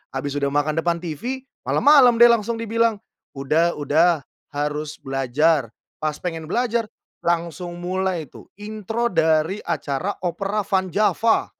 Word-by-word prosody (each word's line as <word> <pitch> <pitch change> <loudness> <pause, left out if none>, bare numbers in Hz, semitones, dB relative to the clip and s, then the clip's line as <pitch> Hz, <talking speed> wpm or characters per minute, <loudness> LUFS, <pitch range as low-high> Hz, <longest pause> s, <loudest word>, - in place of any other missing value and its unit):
habis 140 +2 -3
udah 140 - 0
makan 145 +2 0
depan 170 +1 -1
TV, 240 - -4 0.2
malam-malam 275 -5 +6
deh 235 +1 +7
langsung 230 0 0
dibilang, 230 0 +1 0.4
"Udah, 155 +5 +1
udah 155 +2 +2 0.3
harus 150 +1 -2
belajar". 135 +2 +1 0.3
Pas 155 -1 -1
pengen 165 -1 -5
belajar 235 +3 0 0.4
langsung 170 0 -2
mulai 185 -3 -2
tuh - - -14
intro 215 +3 -3
dari 160 +2 +2
acara 145 +9 -2
Opera 195 +4 -1
Van 190 -1 0
Java. 215 +4 +2
175 Hz, 130 wpm, -22 LUFS, 155-215 Hz, 0.4 s, deh